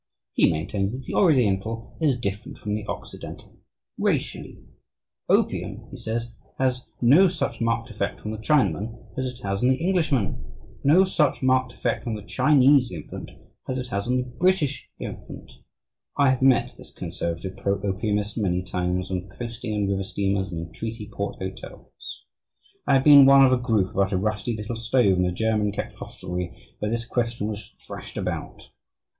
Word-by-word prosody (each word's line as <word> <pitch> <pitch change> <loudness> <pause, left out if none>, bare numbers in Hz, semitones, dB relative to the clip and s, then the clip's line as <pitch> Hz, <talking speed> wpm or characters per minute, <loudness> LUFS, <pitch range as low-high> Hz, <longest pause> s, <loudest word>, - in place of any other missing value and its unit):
He - - +4
maintains 95 +6 -2
that 130 0 -6
the - - -5
Oriental 115 - +2
is 145 -5 +3
different 100 -3 -4
from 105 - -4
the 105 0 -2
Occidental - - -8 0.4
racially. - - -1 0.7
Opium, - - 0
he - - -8
says, 115 +1 -3 0.3
has 130 -1 0
no 145 +11 +7
such 150 -10 -2
marked 115 +1 0
effect 110 - -3
on 105 - -2
the 110 - -5
Chinaman 110 - +1 0.2
as 130 0 -1
it 125 0 -8
has 100 0 -2
on 125 - +4
the 130 - +4
Englishman, 160 - 0 0.4
no 160 +7 +6
such 155 -8 +1
marked 130 -1 +2
effect 120 -1 -2
on 115 - -1
the 105 - -7
Chinese 135 +1 +4
infant 80 -5 -7 0.4
as 130 - -1
it 125 -1 -4
has 100 +1 -2
on 125 +1 +2
the 125 - +1
British 145 +3 0
infant. - - -8 0.7
I 140 -2 +5
have 130 - -1
met 130 -2 +4
this - - -12
"conservative" 85 +3 -4
pro 100 0 0
opiumist 105 +2 -1
many 90 -3 0
times 90 0 -2
on 90 +1 -3
coasting 115 +1 -5
and 105 -1 0
river 95 0 0
steamers 95 -1 -1
and 85 - -4
in 85 0 -9
treaty 110 -1 -6
port 100 0 -3
hotels. 95 0 -9 0.6
I 140 - +5
have 135 - +4
been 140 -2 +9
one 135 0 +8
of 130 - +4
a - - +4
group 110 -6 +1
about 100 0 +1
a - - +2
rusty 110 +3 -1
little 105 +2 -4
stove 115 -5 +3
in 90 - +3
a 90 - 0
German 105 +1 +1
kept 105 - -5
hostelry 90 -1 -6 0.2
where 105 - -1
this 115 +1 -2
question 115 -3 -1
was 105 0 -7
thrashed - - -8
out. - - -5
115 Hz, 175 wpm, -25 LUFS, 100-130 Hz, 0.7 s, been